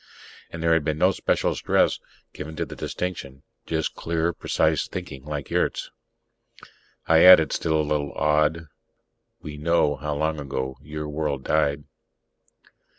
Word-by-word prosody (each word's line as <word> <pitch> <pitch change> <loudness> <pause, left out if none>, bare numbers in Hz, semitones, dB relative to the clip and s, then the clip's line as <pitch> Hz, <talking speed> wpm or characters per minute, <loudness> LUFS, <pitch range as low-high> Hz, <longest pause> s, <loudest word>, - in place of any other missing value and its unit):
And 85 0 -7
there 85 0 +3
had 80 -2 +2
been 75 0 -1
no 90 +4 +4
special - - 0
stress - - +1 0.3
given 75 +1 -7
the - - -2
distinction, 70 -7 -6 0.2
just - - -1
clear, 85 +1 -1
precise - - 0
thinking, 65 0 -7
like 75 -2 -5
Yurt's. - - -1 1.2
I 80 0 +5
added, 90 -5 +8
still 80 -1 0
a - - +2
little 75 -2 -1
awed: 75 +2 +1 0.8
"We 75 -1 -7
know 75 -1 +1
how 75 +2 -3
long 80 +1 -1
ago 65 -1 -4
your 75 +1 -6
world 75 -3 -3
died." 75 -1 +1
75 Hz, 140 wpm, -24 LUFS, 75-80 Hz, 1.2 s, added